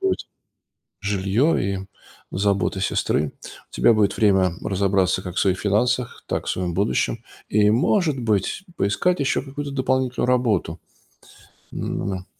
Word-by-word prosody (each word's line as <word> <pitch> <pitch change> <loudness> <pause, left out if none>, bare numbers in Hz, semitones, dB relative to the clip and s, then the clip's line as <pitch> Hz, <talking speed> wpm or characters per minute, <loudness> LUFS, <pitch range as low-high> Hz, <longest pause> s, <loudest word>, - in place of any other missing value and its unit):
будет 385 -1 0 0.8
жилье 100 - +1
и 95 - -9 0.4
забота 95 -1 0
сестры, 75 -5 0 0.4
у - - -43
тебя 115 - +4
будет 105 -2 +2
время 95 -4 +3
разобраться 95 -1 +1
как 90 -2 -7
в - - +2
своих 95 -2 +2
финансах, 120 +4 0
так - - -2
и - - -15
в - - -1
своем 90 -2 -2
будущем. 110 +4 0 0.2
И, 105 0 +3
может 150 - +2
быть, 110 - 0
поискать 175 - +1
еще 135 -2 +1
какую-то 140 +1 -6
дополнительную 130 -2 0
работу. 110 -10 +1 0.9
Ну - - -4
ну - - -3
да. 95 -2 -4
105 Hz, 145 wpm, -23 LUFS, 95-125 Hz, 0.9 s, тебя